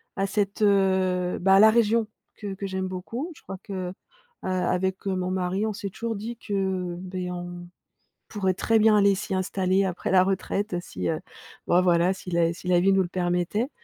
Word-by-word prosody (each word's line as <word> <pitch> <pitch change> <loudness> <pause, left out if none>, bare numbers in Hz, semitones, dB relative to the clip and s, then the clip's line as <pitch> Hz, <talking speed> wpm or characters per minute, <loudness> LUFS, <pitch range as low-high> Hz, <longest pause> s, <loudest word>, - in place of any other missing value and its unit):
à 195 - 0
cette, 200 +1 -1
heu, 190 -3 +2
bah 190 +1 +5
à 195 - +7
la 220 - +8
région 230 -1 +2 0.3
que 205 -2 -6
que 195 +1 -6
j'aime 190 -1 -3
beaucoup 225 - -5
je - - -17
crois 195 - -8
que, 185 -2 -4
heu, - - -10 0.5
avec, 185 +1 -1
heu, 190 - 0
mon 185 0 -2
mari 185 +2 -1
on 215 - -1
s'est 200 0 -5
toujours 230 +4 -4
dit 225 +3 -6
que, 210 - -7
heu, 190 -3 -1
beh 185 -1 -5
on 175 0 -7 0.6
pourrait 190 -3 0
très 225 +4 +2
bien 215 -1 +5
aller 200 -1 +4
s'y 195 0 -4
installer 190 +1 +1
après 185 0 -3
la 185 -1 +6
retraite, 195 +1 -1
si, - - -5
heu, 160 +2 -2 0.5
ben 175 +1 +4
voilà, 175 0 +3
si 190 -1 -9
la 170 -1 +2
si 175 - -10
la 175 -1 +4
vie 195 +2 +4
nous 195 0 +4
le - - -4
permettait. 180 +6 -1
190 Hz, 210 wpm, -25 LUFS, 180-200 Hz, 0.6 s, la